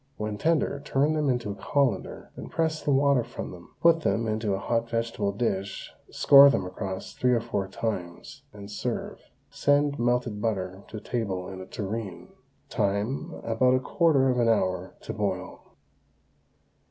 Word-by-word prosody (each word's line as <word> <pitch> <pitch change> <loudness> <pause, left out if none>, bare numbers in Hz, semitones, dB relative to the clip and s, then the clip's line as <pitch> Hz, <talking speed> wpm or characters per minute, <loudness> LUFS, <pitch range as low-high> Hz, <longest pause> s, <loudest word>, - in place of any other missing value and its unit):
When 105 -1 -4
tender, 155 -3 +1
turn 145 +2 +1
them 150 -2 +1
into 120 -5 -1
a - - -3
colander, 140 +5 -1 0.2
press 160 -1 -1
the - - -3
water 140 -2 +4
from 120 - -7
them, 85 -1 -13
put 165 -1 +5
them 115 -5 0
into 110 -2 0
a - - -2
hot 115 +4 -1
vegetable 115 -3 -1
dish, 100 -2 -3 0.2
score 140 0 +8
them 95 -9 0
across 95 +1 -5
three 125 0 +2
or 120 - +3
four 110 -4 -3
times, 90 -6 -5
and 100 0 -10
serve. - - -4 0.3
Send 145 0 +2
melted 120 -3 0
butter 95 -4 -2
to 110 - -7
table 100 -5 -3
in 95 -1 -8
a 95 - -9
tureen. 95 -4 -5 0.4
Time, 105 - -1
about 125 +3 +3
a - - +2
quarter 135 -1 +3
of 125 - 0
an 115 -1 +3
hour 95 -4 0
to - - -6
boil. 95 -4 -4
115 Hz, 160 wpm, -27 LUFS, 100-135 Hz, 0.4 s, score